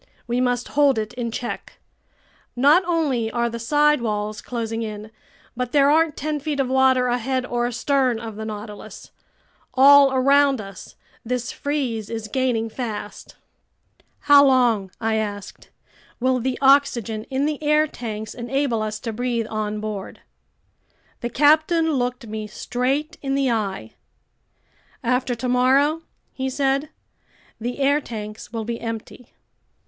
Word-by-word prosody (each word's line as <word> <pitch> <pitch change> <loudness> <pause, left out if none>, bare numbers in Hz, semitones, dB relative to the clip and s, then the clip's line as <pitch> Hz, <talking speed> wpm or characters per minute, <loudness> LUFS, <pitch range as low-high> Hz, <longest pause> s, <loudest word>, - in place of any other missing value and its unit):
We 240 +1 -1
must 245 -1 0
hold 285 -3 +3
it 215 +1 -3
in 240 -2 -3
check. 240 +2 -5 0.8
Not 290 +9 +5
only 285 -10 0
are 235 +1 -1
the 235 - -5
side 295 +3 +3
walls 210 -2 -3
closing 230 -2 -4
in, 215 -1 -6 0.4
but 250 0 -3
there 285 -1 +5
aren't 320 0 +2
ten 305 +1 -2
feet 295 0 -3
of 265 -2 0
water 260 -1 +4
ahead 250 +1 -1
or 240 -1 -1
astern 255 -1 +1
of 225 -2 -7
the 220 - -6
Nautilus. 210 -1 -8 0.6
All 280 +1 +7
around 275 0 +4
us, 195 -3 -10 0.3
this 245 0 -3
freeze 255 -8 -3
is 225 -1 -5
gaining 240 -1 0
fast." 220 -3 -6 0.9
"How 285 -1 +7
long," 245 -7 +3
I 225 -1 0
asked, 205 -2 -5 0.5
"will 255 +1 +1
the 255 +1 -2
oxygen 245 -6 +3
in 270 +1 -1
the 300 -1 -2
air 300 0 +3
tanks 220 -6 -6
enable 245 -1 -1
us 215 0 -3
to 230 -3 -4
breathe 240 0 -1
on 215 -1 -2
board?" 210 -2 -6 1.0
The 240 - -3
captain 310 +5 +3
looked 250 -2 -2
me 215 -1 -5
straight 260 +8 -2
in 275 -1 -1
the 270 -2 +1
eye. 195 - -3 1.1
"After 250 +1 0
tomorrow," 260 +6 +2 0.3
he 265 0 -3
said, 275 +2 0 0.7
"the 240 +2 -4
air 285 +2 +2
tanks 215 -4 -8
will 225 -2 -4
be 235 0 -4
empty!" 230 +1 -7
245 Hz, 140 wpm, -22 LUFS, 220-275 Hz, 1.1 s, All